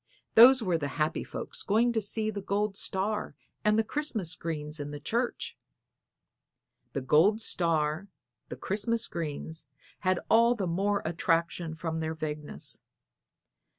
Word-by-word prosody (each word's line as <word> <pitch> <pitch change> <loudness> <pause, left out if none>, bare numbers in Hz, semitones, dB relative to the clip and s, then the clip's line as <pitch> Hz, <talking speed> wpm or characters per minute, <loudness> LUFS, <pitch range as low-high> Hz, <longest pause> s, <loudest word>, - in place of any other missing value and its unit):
Those 250 +2 +8
were 175 -5 +1
the 145 - -2
happy 155 +1 0
folks - - -5
going 230 +4 +2
to 220 - +1
see 215 +1 -1
the 200 -1 -5
gold 200 +1 -1
star 195 -3 -2 0.3
and 210 +1 +3
the 225 - +3
Christmas 220 - -2
greens 150 -2 -4
in 145 0 -4
the 145 0 -6
church. 235 - -2 1.4
The 140 - -2
gold 160 - +4
star, 165 -3 0 0.4
the - - -5
Christmas 225 +4 -1
greens, 160 -1 -5 0.3
had 185 -1 +1
all 235 +2 +5
the 200 -5 -2
more 195 +4 0
attraction 165 0 0
from 160 0 -3
their 160 0 -2
vagueness. 150 -1 -2
185 Hz, 140 wpm, -29 LUFS, 160-215 Hz, 1.4 s, Those